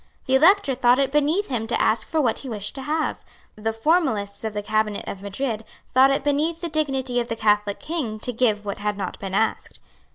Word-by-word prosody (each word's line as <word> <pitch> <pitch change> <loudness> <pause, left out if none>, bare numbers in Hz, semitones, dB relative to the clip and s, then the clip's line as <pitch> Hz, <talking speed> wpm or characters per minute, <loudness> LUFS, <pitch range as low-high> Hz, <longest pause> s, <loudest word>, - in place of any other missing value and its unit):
The 260 - -1
Elector 320 +1 +5
thought 245 0 +4
it 275 -1 +1
beneath 300 +8 +1
him 230 -4 -2
to 240 - -1
ask 220 0 +1
for 320 - 0
what 245 -7 +1
he 270 - -7
wished 205 -3 -4
to 270 - -7
have. 305 +3 -2 0.3
The 220 +1 -2
formalists 225 - 0
of 220 -1 -3
the 205 0 -3
Cabinet 215 -1 -1
of 195 - -6
Madrid 220 +3 -3 0.3
thought 260 +1 +6
it 275 0 +1
beneath 300 +3 +1
the 340 - -3
dignity 270 -5 0
of 235 - -2
the 230 - -3
Catholic 210 -2 +1
King 270 -10 -4
to 245 - -2
give 220 -3 +1
what 200 0 -4
had 210 0 -2
not 190 -3 -5
been 195 -1 -4
asked. 220 +2 -1
245 Hz, 220 wpm, -23 LUFS, 210-285 Hz, 0.3 s, thought